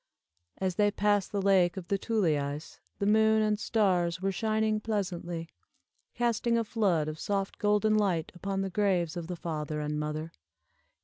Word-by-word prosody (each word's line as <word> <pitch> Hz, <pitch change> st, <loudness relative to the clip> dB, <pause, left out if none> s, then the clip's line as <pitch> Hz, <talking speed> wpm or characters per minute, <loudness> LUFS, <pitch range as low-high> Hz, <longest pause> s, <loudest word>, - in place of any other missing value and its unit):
As 185 Hz, -2 st, -2 dB
they 205 Hz, 0 st, +4 dB
passed 205 Hz, -1 st, +1 dB
the 200 Hz, -2 st, -1 dB
Lake 185 Hz, -3 st, +3 dB
of 180 Hz, -2 st, -6 dB
the 200 Hz, -, 0 dB
Tuleis, 155 Hz, -10 st, -1 dB, 0.2 s
the 200 Hz, -, -1 dB
moon 220 Hz, +1 st, +4 dB
and 210 Hz, -1 st, +1 dB
stars 180 Hz, -6 st, +1 dB
were 195 Hz, +1 st, 0 dB
shining 215 Hz, +2 st, 0 dB
pleasantly, 180 Hz, -6 st, -3 dB, 0.7 s
casting 235 Hz, 0 st, +1 dB
a 230 Hz, -, +1 dB
flood 195 Hz, -9 st, +1 dB
of 155 Hz, 0 st, -5 dB
soft 195 Hz, -1 st, -2 dB
golden 210 Hz, 0 st, +3 dB
light 185 Hz, -7 st, +1 dB
upon 195 Hz, +2 st, -3 dB
the 195 Hz, -1 st, -3 dB
graves 180 Hz, -5 st, +1 dB
of 170 Hz, -2 st, -5 dB
the 180 Hz, -, -4 dB
father 155 Hz, -2 st, -4 dB
and 150 Hz, 0 st, -2 dB
mother. 155 Hz, +2 st, -3 dB
195 Hz, 165 wpm, -29 LUFS, 170-210 Hz, 0.7 s, they